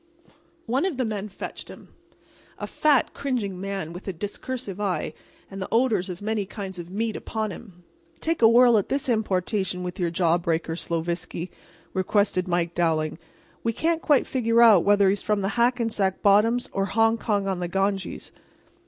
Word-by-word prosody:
One 255 +6 0
of 370 -8 -1
the 255 - 0
men 210 -1 -4
fetched 195 - -7
him—a - - -14
fat, 295 -4 +2
cringing 215 -9 -3
man, 195 -4 -4
with 180 +3 -10
a 195 - -2
discursive 205 +2 -5
eye 195 -3 -1 0.4
and 195 0 -7
the 190 - -3
odors 225 -6 +2
of 180 +2 -7
many 215 -1 -1
kinds 190 -3 -7
of 170 0 -8
meats 220 +3 -2
upon 220 -2 -3
him. 180 -2 -12 0.4
"Take 330 -3 -1
a 225 - +8
whirl 235 -1 +6
at 200 - -4
this 275 0 -1
importation 195 -4 0
with 180 +1 -6
your 175 -2 +1
jaw 170 0 +2
breakers, 165 0 -2
Sloviski," 170 +1 -3 0.4
requested 190 -1 +1
Mike 175 -1 0
Dowling. 160 -2 0 0.4
"We 230 - 0
can't 330 +6 0
quite 290 -4 +3
figure 235 -2 +3
out 215 -7 +7
whether 205 -1 +4
he's 195 +1 +1
from 210 -1 0
the 195 - 0
Hackensack 230 -5 0
bottoms 215 +4 +4
or 195 0 0
Hongkong 225 -1 +1
on 190 -2 -1
the 175 - -2
Ganges." 195 +1 -2
200 Hz, 170 wpm, -25 LUFS, 180-230 Hz, 0.4 s, a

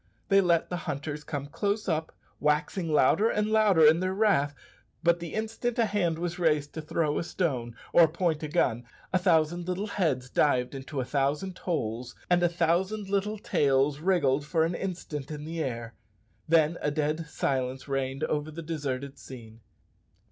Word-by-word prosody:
They 195 -1 +6
let 170 -2 +2
the 180 - -1
hunters 150 +1 -4
come 145 -3 -4
close 205 +8 -2
up, 160 -2 -1 0.3
waxing 150 +3 0
louder 155 - +4
and 210 0 0
louder 205 -7 +5
in 155 +2 +6
their 185 +1 -1
wrath; 190 -9 +2 0.5
but 170 0 +3
the 170 -2 -6
instant 225 +2 -2
a 230 - +4
hand 190 -6 0
was 175 +1 -3
raised 150 -4 +1
to 160 - -5
throw 155 -1 0
a - - -2
stone 130 -11 -2 0.2
or 170 -1 +7
point 165 -1 -1
a 155 - -3
gun, 125 -7 +1 0.3
a 185 - +4
thousand 175 -1 +2
little 185 +3 -2
heads 155 -11 -1
dived 125 -4 +2
into 135 +1 -5
a - - -3
thousand 145 +8 -1
holes, 125 -8 -3 0.2
and 175 0 +4
a 175 - +4
thousand 180 +5 0
little 200 +2 0
tails 140 -5 +1
wriggled 150 -6 +2
for 160 +2 +1
an 165 - -1
instant 170 -6 -5
in 150 -1 -6
the 165 0 -3
air 120 -3 -5 0.5
then 165 +1 +3
a - - +1
dead 155 +2 -1
silence 130 -2 -2
reigned 135 -1 -2
over 150 0 -1
the 165 +2 -7
deserted 140 -4 -4
scene. 115 -3 -11
160 Hz, 175 wpm, -28 LUFS, 140-180 Hz, 0.5 s, or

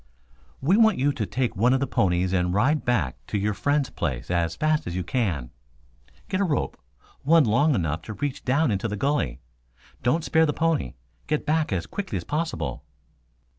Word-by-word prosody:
"We 170 +10 +3
want 220 -3 +5
you 140 +3 +2
to 110 -8 -3
take 120 +5 -1
one 120 +6 +3
of - - +1
the 140 - 0
ponies 90 -5 +1
and 90 0 +1
ride 145 +9 +2
back 105 - -1
to - - -2
your 105 +1 0
friend's 145 +5 0
place - - -3
as 85 -2 0
fast 155 - +1
as 85 - -4
you 90 - -1
can. 85 - -1 0.8
Get 185 - -1
a - - +4
rope, 145 - -1 0.5
one 165 +2 +5
long 140 +6 +3
enough 80 -5 -1
to - - -3
reach 145 +1 -3
down 140 +1 +2
into 100 +2 -1
the 105 -1 -4
gully. 140 - -1 0.6
Don't 140 +7 +1
spare 160 0 +3
the 150 - 0
pony. 160 - 0 0.3
Get 150 0 -1
back 155 -2 +1
as 90 -4 -1
quickly 195 - -4
as 85 - -4
possible." 155 - -3
125 Hz, 190 wpm, -25 LUFS, 95-150 Hz, 0.8 s, want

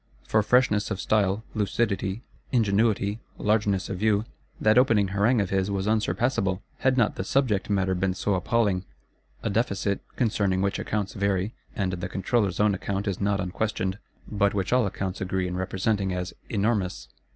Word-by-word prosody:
For 110 - +3
freshness 105 -2 +3
of 110 -3 -3
style, 105 0 +1
lucidity, 100 0 -1 0.3
ingenuity, 105 -2 +2 0.2
largeness 105 -3 +1
of 95 - -4
view, 105 0 +2 0.3
that 110 +3 +5
opening 110 -6 +3
Harangue 105 +4 +2
of 100 - -3
his 95 0 +1
was 95 -1 -1
unsurpassable:—had 110 +3 0
not 115 -4 +2
the - - -1
subject 110 -3 +1
matter 95 -2 +1
been 95 0 0
so 100 +1 0
appalling. 95 0 +1 0.6
A 115 - -1
Deficit, 100 -2 0
concerning 100 -5 +1
which 100 - 0
accounts 105 -2 -2
vary, 100 +1 0 0.2
and 95 -2 0
the 90 +1 -4
Controller's 95 0 0
own 105 -1 +4
account 100 +2 -3
is 100 -1 -2
not 100 -1 +1
unquestioned; 95 +1 -2 0.3
but 100 -1 +1
which 95 +3 0
all 125 -4 +4
accounts 95 0 -4
agree 95 -1 -1
in 90 - -4
representing 95 +2 -1
as 90 0 -3 0.2
"enormous." 100 -3 0
100 Hz, 160 wpm, -26 LUFS, 95-110 Hz, 0.6 s, that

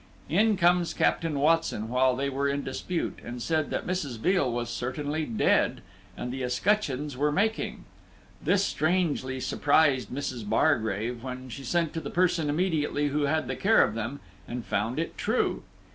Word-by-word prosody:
In 210 +6 +3
comes 175 -1 +3
Captain 165 -3 +1
Watson, 155 -7 +2
while 125 +2 +2
they 140 +2 -1
were 140 +1 0
in 140 0 -1
dispute, 165 +6 -3
and 120 +1 -6
said 155 +4 0
that - - -2
Mrs. 160 -10 -2
Veal 180 - +2
was 120 0 -3
certainly 145 +6 -2
dead, 115 -5 +2 0.4
and 125 0 -4
the 135 - -4
escutcheons 145 0 0
were 145 +3 +1
making. 220 +7 -1 0.6
This 200 0 +2
strangely 155 -6 0
surprised 140 -4 +2
Mrs. 130 -3 -4
Bargrave, 115 -4 +1
when 130 0 -6
she 130 +4 -7
sent 165 +4 0
to 165 - -3
the - - -5
person 175 -4 +1
immediately 150 -3 0
who 145 +1 0
had 155 +2 0
the - - -2
care 220 +3 +5
of - - -1
them, 115 +5 -4 0.3
and 120 -1 -5
found 110 +5 -1
it 165 - -3
true. 220 +4 0
145 Hz, 165 wpm, -27 LUFS, 125-165 Hz, 0.6 s, care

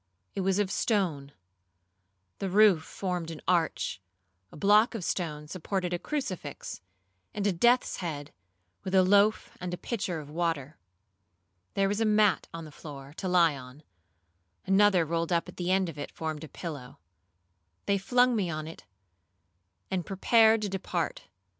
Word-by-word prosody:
It 195 - -2
was 190 0 +1
of 205 -2 0
stone; 170 - 0 1.1
the 195 - -2
roof 200 -3 +5
formed 180 -3 -4
an 160 -2 -7
arch; 165 - 0 0.5
a - - -12
block 210 +7 +4
of 210 - -4
stone 150 -4 -3
supported 180 +2 -3
a 175 - -1
crucifix, 185 - -5 0.5
and 205 -1 -2
a 205 - +3
death's 240 +8 +3
head, 150 -5 -5 0.5
with 190 0 -2
a 190 - +6
loaf 205 +3 +3
and 180 0 -3
a - - -14
pitcher 195 -8 -3
of 150 - -9
water. 160 -3 -2 1.0
There 195 0 +3
was 205 +3 -1
a - - +3
mat 210 -2 +3
on 165 -1 -7
the 155 - -11
floor, 140 -2 -10
to 190 - -3
lie 170 -4 +4
on; 130 +3 -11 0.8
another 195 -2 +4
rolled 165 +2 -1
up 170 -1 +1
at - - -11
the 175 0 -2
end 190 -1 +2
of 155 -3 -7
it 145 - -5
formed 155 -1 -4
a - - -7
pillow. 145 -8 -7 0.9
They 200 -1 +2
flung 245 +4 +3
me 195 -5 0
on 155 -1 -4
it, 160 - -11 1.1
and 185 -2 0
prepared 220 +4 +4
to 205 - -1
depart. 180 -3 -3
180 Hz, 160 wpm, -29 LUFS, 160-200 Hz, 1.1 s, a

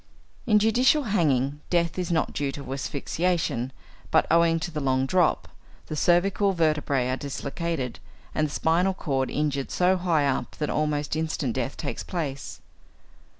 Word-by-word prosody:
In 215 -2 +5
judicial 245 +7 +4
hanging, 145 - +1
death 170 0 +1
is 180 -1 -2
not 160 - +1
due 140 -1 -1
to 140 -1 -6
asphyxiation, 140 -1 -1 0.4
but, - - +4
owing 165 0 +4
to 175 - -3
the 155 - -3
long 130 -2 +1
drop, 175 +3 +2 0.4
the 155 - -5
cervical 190 +4 +2
vertebræ 150 -6 +1
are - - -2
dislocated, 140 -1 -4 0.3
and 155 - +1
the - - -9
spinal 175 +5 +2
cord 135 -6 -1
injured 140 -2 -1
so 185 +1 +2
high 170 -5 +1
up 135 -2 -1
that 150 - -2
almost 150 -1 0
instant 155 -6 -1
death 130 +2 -3
takes 145 - -4
place. 140 -7 -5
155 Hz, 150 wpm, -26 LUFS, 140-175 Hz, 0.4 s, In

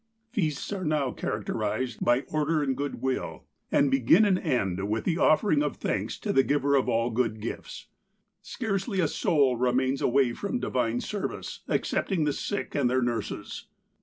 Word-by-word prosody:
" 225 0 -46
Feasts 160 - -1
are 190 -2 -4
now 150 -5 0
characterized 110 +3 -3
by 120 +2 +3
order 155 +1 0
and 135 -2 0
good 140 0 -4
will, 130 -1 -2 0.3
and 140 -1 +3
begin 135 - +5
and 190 -3 +3
end 100 - -1
with 110 +1 -1
the 170 -1 0
offering 155 -1 +4
of 150 - -1
thanks - - -2
to - - -2
the 135 - +6
Giver 140 +1 +1
of 135 - +2
all 115 +1 +1
good 115 -2 0
gifts. 110 - -6 0.6
Scarcely 200 -3 -2
a 170 - +3
soul 140 -5 +2
remains 130 +2 +1
away 125 -1 +3
from 200 - -3
divine 120 - -1
service, 205 -2 -4
excepting 185 -6 0
the 150 -1 +1
sick, 205 - -3
and 135 -4 +2
their 130 0 +2
nurses. 120 -1 -4
135 Hz, 170 wpm, -27 LUFS, 120-160 Hz, 0.6 s, the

